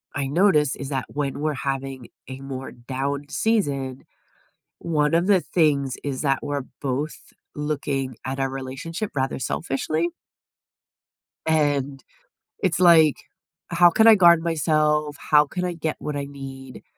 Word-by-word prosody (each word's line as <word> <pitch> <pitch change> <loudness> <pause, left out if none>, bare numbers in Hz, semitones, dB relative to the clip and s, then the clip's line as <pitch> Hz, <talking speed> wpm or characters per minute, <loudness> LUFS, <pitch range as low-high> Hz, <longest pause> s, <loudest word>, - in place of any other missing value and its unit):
I 140 -1 -1
notice 150 -3 +3
is 140 0 -6
that 135 -2 -2
when 140 -1 -3
we're 155 -1 0
having 135 -2 -4 0.2
a 130 0 -8
more 135 -1 -6
down 135 +4 -4
season, 140 - -1 0.7
one 150 -2 0
of 175 +3 +2
the 190 -4 +4
things 140 -6 +1
is 140 -2 -3
that 135 -2 +1
we're 145 -2 -2 0.2
both 140 +3 -2 0.4
looking 140 -4 -2
at 135 +1 -3
our 135 0 0
relationship 135 +9 -5
rather 135 0 -1
selfishly. 155 +5 -1 1.4
And 145 -3 +1 0.6
it's 185 -2 +1
like, 165 -4 +6 0.5
"How 175 0 +6
can 220 +6 +4
I 220 - +9
guard 170 -3 +6
myself? 150 -2 +1
How 150 0 +4
can 180 +4 -4
I 175 - -2
get 160 -1 -3
what 150 -1 -4
I 140 -1 -3
need?" 135 -2 -10
145 Hz, 140 wpm, -23 LUFS, 135-160 Hz, 1.4 s, I